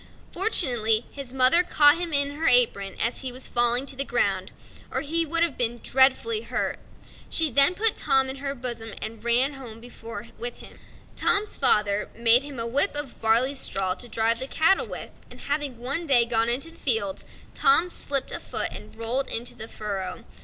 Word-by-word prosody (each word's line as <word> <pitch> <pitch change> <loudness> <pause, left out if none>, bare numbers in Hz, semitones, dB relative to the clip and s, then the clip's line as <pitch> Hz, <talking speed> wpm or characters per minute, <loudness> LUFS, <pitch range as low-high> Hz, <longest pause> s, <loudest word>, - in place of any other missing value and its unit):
Fortunately 245 - +1
his 275 -3 -8
mother 260 +6 +5
caught 300 -3 +4
him 350 -2 -4
in 285 -1 +1
her 315 +3 -3
apron 225 -6 +2
as 235 - -1
he 260 -2 -4
was 255 +2 -7
falling 240 +2 +2
to 275 - -2
the 275 - -1
ground, 195 -7 -1 0.4
or 265 - -2
he 325 +3 -1
would 335 +2 +2
have 340 - -2
been 240 -1 0
dreadfully 270 - +2
hurt. - - -3 0.5
She 320 -3 +1
then 280 +8 +4
put 445 +2 +2
Tom 270 -2 +2
in 265 +1 -6
her 275 0 -5
bosom 235 -4 -6
and 225 +1 -7
ran 245 +4 +1
home 245 -5 -11 0.6
with 240 0 -4
him. - - -15 0.4
Tom's 420 +1 0
father 210 -6 +1
made 235 +1 +7
him 285 -2 -10
a 230 - -3
whip 280 +9 0
of 290 -3 -6
barley 230 +5 +3
straw 195 -8 +1
to 245 - -8
drive 230 0 0
the 260 - -3
cattle 325 +7 +1
with, - - -7 0.2
and - - -13
having 285 -3 -3
one 275 +8 -4
day 245 -4 +4
gone 230 0 +1
into 275 +7 -1
the - - -19
fields, 295 -10 -1 0.3
Tom 360 -6 +3
slipped 275 -5 -1
a - - -4
foot - - -1
and - - -9
rolled 235 +4 -2
into 240 +2 -3
the 220 - -8
furrow. 195 -5 -6
260 Hz, 190 wpm, -24 LUFS, 230-290 Hz, 0.6 s, made